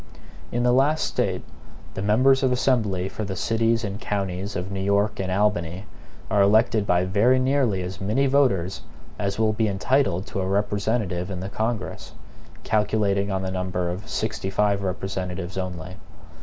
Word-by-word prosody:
In 120 0 0
the 125 - +4
last 145 +5 +3
State - - -1 0.5
the 95 - -4
members 130 +7 +4
of 130 -2 +2
Assembly 110 -8 +1
for 110 - -5
the 95 -2 -4
cities 115 +3 +1
and 100 0 -4
counties 100 0 -3
of 90 +2 -4
New 95 - -3
York 100 +2 +1
and 95 -1 -2
Albany 95 -2 0 0.4
are 100 - +2
elected 110 +1 +3
by 90 +1 +3
very 110 +7 +3
nearly 130 -7 +1
as 95 +1 -6
many 110 +8 +1
voters 125 -10 +2 0.4
as 100 -1 -1
will 110 -1 +2
be 110 0 +1
entitled 100 -1 +1
to 100 - -4
a 95 - -2
representative 100 -2 -1
in 95 -2 -4
the 95 +2 -5
Congress, 110 +2 -3 0.5
calculating 105 -2 +1
on 95 0 -1
the 95 - -3
number 90 -1 -2
of 90 +4 -7
sixty 110 -3 -2
five 100 0 +1
representatives 95 -1 -4
only. 90 -1 -5
100 Hz, 165 wpm, -24 LUFS, 95-110 Hz, 0.5 s, the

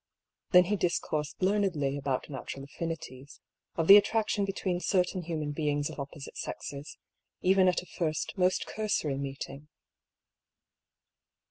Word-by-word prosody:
Then 180 -2 +8
he 200 +4 0
discoursed 160 -3 -1
learnedly 185 -9 +1
about 135 -2 -2
natural 135 -1 -6
affinities, 140 -3 -7 0.4
of 165 - 0
the 200 - +12
attraction 210 0 +2
between 190 -2 -2
certain 180 0 +1
human 155 -3 -3
beings 145 -1 -1
of - - -10
oppo 140 +2 -6
site 140 - -9
sexes, 140 +2 -6 0.4
even 190 0 +4
at 180 0 +2
a - - -14
first 160 -4 -2
most 185 -1 +2
cursory 180 -10 -1
meeting. 140 +1 -6
165 Hz, 130 wpm, -30 LUFS, 145-185 Hz, 0.4 s, the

